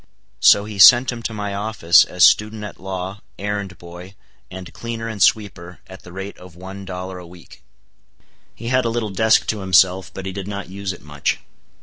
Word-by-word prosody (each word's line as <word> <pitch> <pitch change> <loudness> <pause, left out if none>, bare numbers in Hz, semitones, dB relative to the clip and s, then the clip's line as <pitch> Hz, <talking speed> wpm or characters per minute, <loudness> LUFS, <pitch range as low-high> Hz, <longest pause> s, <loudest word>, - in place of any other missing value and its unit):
So 100 +9 +5
he 105 -2 -8
sent 120 +6 +8
him 120 -1 -7
to 115 - -4
my 105 -2 -5
office 100 -5 +3
as 90 0 0
student 105 +1 +3
at 105 - -9
law, 95 +2 -6 0.2
errand 100 -2 -4
boy, 90 +3 -12 0.3
and 95 0 -10
cleaner 115 -1 -6
and 110 -3 -6
sweeper, 90 -6 0
at 95 0 -13
the 90 - -14
rate 95 +2 -8
of 90 -2 -14
one 95 +2 -10
dollar 90 0 -7
a 90 - -12
week. 85 -1 -16 0.9
He 115 +1 -6
had 130 0 +2
a 115 - -1
little 115 -2 -3
desk 110 +3 +3
to 110 - -2
himself, 95 0 +2
but 95 - -8
he 95 - -4
did 95 0 -7
not 100 -2 -6
use 100 0 -5
it 90 - -11
much. 75 -1 -2
95 Hz, 200 wpm, -20 LUFS, 90-105 Hz, 0.9 s, sent